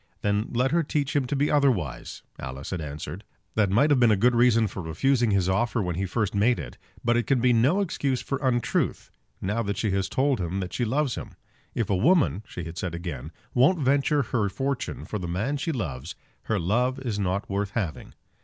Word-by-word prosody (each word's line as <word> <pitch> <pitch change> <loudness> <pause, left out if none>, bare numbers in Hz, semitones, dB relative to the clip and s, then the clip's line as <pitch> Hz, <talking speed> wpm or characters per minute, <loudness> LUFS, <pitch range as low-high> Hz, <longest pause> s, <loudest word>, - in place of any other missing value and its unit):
"Then 105 +1 +1
let 125 +2 +1
her 170 +1 +3
teach 145 -2 -1
him 140 -3 +2
to 145 - -1
be 145 +2 +1
otherwise," 125 - 0 0.2
Alice 65 +2 -6
had 90 -3 -2
answered. 75 +5 -6 0.3
"That 105 -3 +2
might 135 +10 +4
have 140 - +4
been 120 -2 +5
a 105 - +5
good 125 +5 +4
reason 120 -1 +4
for 100 - -5
refusing 120 +10 +1
his 100 -3 +2
offer 115 +6 +1
when 90 -4 -1
he 95 +3 -2
first 105 +1 -1
made 110 +5 +3
it; - - -8 0.3
but 120 0 +3
it 120 - 0
can 135 -3 +3
be 125 +1 +4
no 135 - +3
excuse 140 -8 -1
for 135 +2 -3
untruth, 125 -3 0 0.3
now 105 +5 0
that 100 -2 -2
she 110 - 0
has 95 0 0
told 135 -4 +1
him 90 +2 -2
that 90 -2 -4
she 120 - 0
loves 135 +3 0
him!" - - -7 0.4
"If 115 - 0
a - - +3
woman," 140 - +3
she 90 - -6
had 80 +1 -7
said 85 -2 -3
again, 80 -4 -6 0.2
"won't 135 +9 +4
venture 140 +1 +2
her 110 -4 0
fortune 135 +5 -3
for 105 - -4
the 90 - -4
man 110 +12 -1
she 150 +4 -2
loves, 85 - -4 0.3
her - - 0
love 125 +9 +1
is 120 -6 -3
not 100 +1 -1
worth 100 0 -1
having." 90 -9 -4
115 Hz, 220 wpm, -26 LUFS, 95-135 Hz, 0.4 s, been